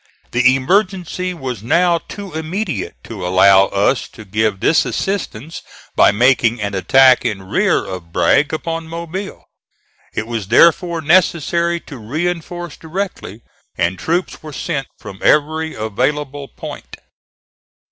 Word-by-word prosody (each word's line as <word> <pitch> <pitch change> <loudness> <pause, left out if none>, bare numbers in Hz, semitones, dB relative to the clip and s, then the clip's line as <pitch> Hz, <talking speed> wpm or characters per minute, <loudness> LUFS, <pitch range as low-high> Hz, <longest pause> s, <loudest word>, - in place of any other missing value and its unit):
The 130 +2 +4
emergency 185 +4 0
was 130 - -5
now 170 +8 +2
too 200 +1 -9
immediate 160 - -3
to 105 -5 -8
allow 95 +2 +5
us 100 +7 0
to 110 - -13
give 105 0 0
this 155 - +3
assistance 165 - -4 0.3
by - - +6
making 120 +1 +3
an 100 -1 -3
attack 130 +7 +5
in 95 -2 -2
rear 95 - +1
of 90 -3 -8
Bragg 145 - +3
upon 165 +1 -4
Mobile. 170 +4 -6 0.7
It 110 - -2
was 115 -4 -4
therefore 170 - +4
necessary 170 +1 +2
to 140 -5 -11
reinforce 170 +6 -4
directly, 160 - -5 0.3
and 85 +1 0
troops 175 - -2
were 155 - -9
sent 140 -2 -3
from 95 - -10
every 155 +2 +2
available 135 +6 -2
point. - - -9
145 Hz, 125 wpm, -18 LUFS, 110-170 Hz, 0.7 s, by